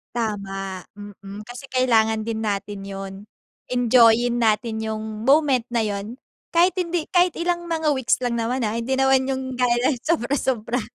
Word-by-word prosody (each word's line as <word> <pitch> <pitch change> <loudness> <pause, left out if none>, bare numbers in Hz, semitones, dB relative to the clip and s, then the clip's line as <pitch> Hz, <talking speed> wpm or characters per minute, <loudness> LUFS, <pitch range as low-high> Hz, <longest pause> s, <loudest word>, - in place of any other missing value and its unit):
Tama, 195 -4 -3
mm 205 0 -10
kasi 245 +4 -10
kailangan 225 -4 +2
din 225 0 -3
natin 205 -1 -3
yun. 195 0 -6 0.5
Enjoyin 240 -1 +4
natin 220 0 +1
yung 220 -1 -3 0.2
moment 275 -4 +4
na 235 -2 0
yun, 205 +2 -4 0.4
kahit 350 +2 +5
hindi 345 -2 -1
kahit 360 -2 +3
ilang 345 0 -2
mga 320 -2 0
weeks 260 -4 +1
lang 235 -1 0
naman, 240 +3 -1
ha, 220 +1 -1
hindi 255 +3 -1
naman 265 0 +3
yung 265 -1 -2 0.2
gaya 245 -1 +3 0.2
ng 250 - -4
sobra-sobra. 250 -6 0
240 Hz, 155 wpm, -23 LUFS, 215-265 Hz, 0.5 s, kahit